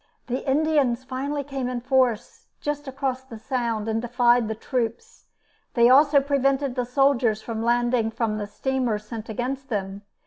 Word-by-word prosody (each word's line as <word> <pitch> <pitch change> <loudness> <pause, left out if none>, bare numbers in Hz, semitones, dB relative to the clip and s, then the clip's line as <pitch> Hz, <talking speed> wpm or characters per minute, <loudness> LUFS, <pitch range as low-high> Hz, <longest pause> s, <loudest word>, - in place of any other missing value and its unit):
The 255 +2 -3
Indians 280 -4 +2
finally 275 +3 -3
came 270 -2 -4
in 250 -1 -3
force 255 -3 0
just 290 0 -3
across 265 -1 -2
the 240 -4 -10
Sound 230 -2 -2
and 225 0 0
defied 240 -1 +3
the 220 - -3
troops. 230 0 -4 0.5
They 235 0 +6
also 285 +2 +6
prevented 275 -1 +1
the 250 -1 -1
soldiers 250 -4 +2
from 225 -1 -4
landing 240 0 +2
from 225 -1 -2
the 205 - -4
steamer 250 +1 -1
sent 215 +1 -8
against 260 +5 -4
them. 200 -2 -3
250 Hz, 160 wpm, -24 LUFS, 225-270 Hz, 0.5 s, They